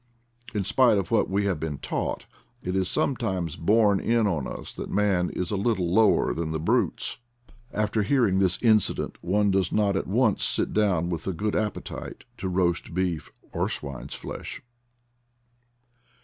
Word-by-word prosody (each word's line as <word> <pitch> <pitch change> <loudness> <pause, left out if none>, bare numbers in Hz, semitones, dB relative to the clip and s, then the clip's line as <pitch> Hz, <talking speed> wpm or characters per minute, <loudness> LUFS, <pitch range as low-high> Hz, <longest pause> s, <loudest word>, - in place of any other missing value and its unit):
In 100 - +1
spite 120 +2 +4
of 100 +1 -2
what 115 - +2
we 100 +1 +1
have 95 -6 0
been 75 -2 -3
taught, - - -3 0.4
it 90 +1 -2
is 95 -1 +1
sometimes 95 - -1
borne 105 +2 +3
in 115 +1 +2
on 80 -9 -1
us - - -7
that - - -6
man 95 -4 +1
is 90 -1 -3
a - - 0
little 95 -4 0
lower 110 +1 +4
than 80 -1 -3
the 80 0 -2
brutes. 80 - 0 0.5
After 105 +1 0
hearing 105 -4 +2
this 95 -2 +2
incident 110 -4 +2
one 100 +3 +2
does 95 -2 +1
not 100 -2 +2
at - - -1
once 110 +1 +2
sit - - 0
down 95 -6 +2
with 85 +1 -4
a 95 - 0
good 105 +5 -2
appetite 105 -2 -4
to 95 - -3
roast 90 -2 0
beef 90 -4 -1 0.2
or - - 0
swine's 70 -2 -4
flesh. - - -7
95 Hz, 165 wpm, -26 LUFS, 90-105 Hz, 0.5 s, spite